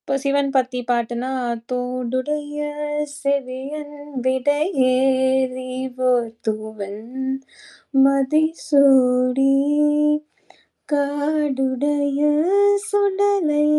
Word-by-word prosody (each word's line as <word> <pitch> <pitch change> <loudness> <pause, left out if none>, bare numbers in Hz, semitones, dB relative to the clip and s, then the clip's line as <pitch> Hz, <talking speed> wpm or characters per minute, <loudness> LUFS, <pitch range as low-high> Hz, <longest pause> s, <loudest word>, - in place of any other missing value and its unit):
இப்போ - - -3
சிவன் 280 0 +1
பத்தி 255 -1 +1
பாட்டுனா, 240 +1 -1 0.4
"தோடுடைய 255 +4 -3 0.6
செவியன் 280 +2 -3 0.3
விடையேறி 260 -2 +1 0.4
ஓர் 240 -2 +1 0.2
தூவெண்மதி 265 +6 -1 0.2
சூடிக் 280 +2 +3 0.7
காடுடைய 285 -1 0 0.7
சுடலை 400 -7 +2
270 Hz, 50 wpm, -21 LUFS, 255-295 Hz, 0.7 s, சூடிக்